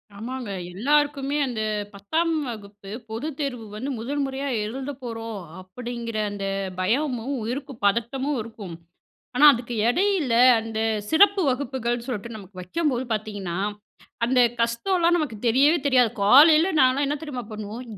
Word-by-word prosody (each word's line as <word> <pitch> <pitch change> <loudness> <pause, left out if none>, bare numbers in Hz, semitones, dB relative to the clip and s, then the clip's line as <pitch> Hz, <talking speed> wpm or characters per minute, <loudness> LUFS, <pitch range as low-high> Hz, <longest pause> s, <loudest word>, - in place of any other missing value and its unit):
ஆமாங்க. 245 +2 -6 0.2
எல்லாருக்குமே 285 +5 +1
அந்த 235 -4 -3 0.3
10ஆம் 315 +13 -1 0.2
வகுப்பு 205 -3 -9 0.2
பொதுத்தேர்வு 270 -1 -4
வந்து 250 +6 -4
முதல் 280 +6 -2
முறையா 270 +1 -3 0.2
எழுதப்போறோம் 235 -3 -6 0.2
அப்படிங்கிற 230 +4 -6
அந்த 200 -1 -5 0.3
பயமும், 250 +5 0
உயிருக்கு 265 +5 -4
பதட்டமும் 260 +7 0
இருக்கும். 215 -6 -8 0.6
ஆனா 290 +4 +6
அதுக்கு 240 -1 -4
எடையில, 350 - +1 0.3
அந்த 225 0 -5 0.3
சிறப்பு 400 +4 +5
வகுப்புகள் 245 -2 -2
சொல்ட்டு 235 -2 -5
நமக்கு 195 -2 -13
வைக்கும்போது 260 - -1
பார்த்தீங்கன்னா, 205 -5 -4 0.7
அந்த 250 +2 +3 0.2
கஷ்டம்லாம் 340 +9 +2
நமக்கு 290 -9 -3
தெரியவே 280 +8 +4
தெரியாது. 250 -4 +4
காலையில 305 - +7
நான்ல்லாம் 260 +2 +3
என்ன 290 +2 -1
தெரியுமா 260 -6 -5
பண்ணுவோம்? 215 +3 -6
245 Hz, 120 wpm, -24 LUFS, 220-285 Hz, 0.7 s, காலையில